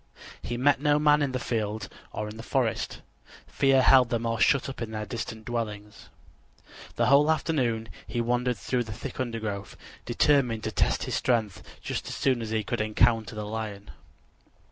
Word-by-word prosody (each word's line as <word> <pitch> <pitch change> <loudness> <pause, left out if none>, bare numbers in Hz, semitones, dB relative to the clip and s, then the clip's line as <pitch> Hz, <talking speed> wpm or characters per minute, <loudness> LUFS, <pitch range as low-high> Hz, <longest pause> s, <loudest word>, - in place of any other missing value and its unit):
He 120 - -4
met 140 +2 +3
no 145 -1 +3
man 150 0 +4
in 140 -2 0
the 130 - -1
field 110 -4 -2 0.2
or 105 - -4
in 105 - -8
the - - -6
forest: 120 -1 -1 0.4
fear 135 -1 +3
held 130 -2 +6
them 115 -1 -1
all 115 -1 -1
shut 140 +2 +3
up 135 -2 -7
in 115 - -3
their 110 -1 -4
distant 110 0 -6
dwellings. 105 -3 -5 0.9
The 120 - +2
whole 140 +4 +5
afternoon 130 -8 0 0.2
he 120 - -3
wandered 120 +1 0
through 125 -2 -1
the 110 - -6
thick 105 - -7
undergrowth, 110 -5 -4 0.3
determined 120 -2 +2
to 110 - -2
test - - +1
his - - -4
strength 110 -6 0 0.2
just - - -4
as - - -5
soon 130 -3 +1
as 110 - -4
he 110 -1 -1
should - - -1
encounter 110 +1 +2
the 105 0 -4
lion. 105 -2 -5
115 Hz, 180 wpm, -27 LUFS, 110-130 Hz, 0.9 s, held